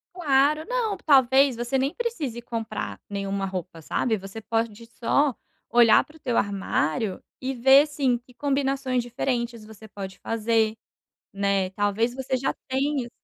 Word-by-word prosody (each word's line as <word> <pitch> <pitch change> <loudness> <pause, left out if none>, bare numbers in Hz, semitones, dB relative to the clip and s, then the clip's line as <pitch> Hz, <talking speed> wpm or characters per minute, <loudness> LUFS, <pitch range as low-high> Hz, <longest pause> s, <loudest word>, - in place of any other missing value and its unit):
Claro. 300 -2 +3
Não, 475 -5 0
talvez 270 -3 +4
você 240 +3 -3
nem 270 +2 +1
precise 330 - -3
comprar 215 - -5
nenhuma 200 -1 -2
roupa, 180 -3 -6
sabe? 220 +8 0
Você 195 +2 -8
pode 225 0 -2
só 250 +3 +1 0.4
olhar 235 -2 +6
pro 315 +1 -18
teu 245 -5 -1
armário 195 -1 0 0.2
e 265 +1 -2
ver, 270 +4 +6
sim, 265 -5 0
que 245 +1 -22
combinações 270 -2 0
diferentes 235 -1 -3
você 220 0 -13
pode 195 -2 -8
fazer, 225 -1 0 0.6
né. 195 -1 0
Talvez 205 +4 0
você 260 0 -2
já 270 - -1
tenha, 270 0 0
assim - - -14
240 Hz, 145 wpm, -25 LUFS, 210-270 Hz, 0.6 s, olhar